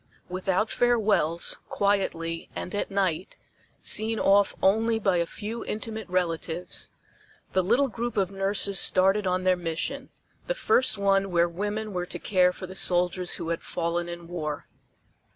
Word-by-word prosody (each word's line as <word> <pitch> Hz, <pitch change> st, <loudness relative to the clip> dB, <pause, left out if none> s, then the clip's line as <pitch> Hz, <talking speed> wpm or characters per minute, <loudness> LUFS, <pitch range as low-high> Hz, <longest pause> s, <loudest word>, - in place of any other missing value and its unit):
Without 190 Hz, +3 st, 0 dB
farewells, 210 Hz, -9 st, +2 dB
quietly 165 Hz, -5 st, -1 dB
and 180 Hz, -, -5 dB
at 205 Hz, -, -2 dB
night, 190 Hz, -3 st, -1 dB, 0.5 s
seen 220 Hz, +1 st, +2 dB
off 200 Hz, 0 st, +4 dB
only 225 Hz, +4 st, +3 dB
by 195 Hz, -4 st, +1 dB
a 170 Hz, -1 st, 0 dB
few 225 Hz, +5 st, -6 dB
intimate 220 Hz, -1 st, -4 dB
relatives, 175 Hz, -1 st, -2 dB, 0.6 s
the 190 Hz, -, +3 dB
little 240 Hz, +9 st, +3 dB
group 235 Hz, -1 st, -4 dB
of 195 Hz, -1 st, +1 dB
nurses 195 Hz, 0 st, +1 dB
started 195 Hz, +2 st, +4 dB
on 185 Hz, 0 st, 0 dB
their 185 Hz, 0 st, +4 dB
mission 175 Hz, -, -4 dB, 0.4 s
the -, -, 0 dB
first 260 Hz, -, +2 dB
one 195 Hz, 0 st, +2 dB
where 170 Hz, -1 st, +3 dB
women 205 Hz, +4 st, -4 dB
were 180 Hz, -1 st, -3 dB
to -, -, -5 dB
care 180 Hz, -2 st, +3 dB
for 185 Hz, -, -8 dB
the 185 Hz, -, -9 dB
soldiers 180 Hz, -1 st, +2 dB
who 165 Hz, -, -4 dB
had 170 Hz, -, -2 dB
fallen 170 Hz, 0 st, -2 dB
in 170 Hz, -1 st, -8 dB
war. 155 Hz, -4 st, -4 dB
190 Hz, 150 wpm, -26 LUFS, 175-210 Hz, 0.6 s, off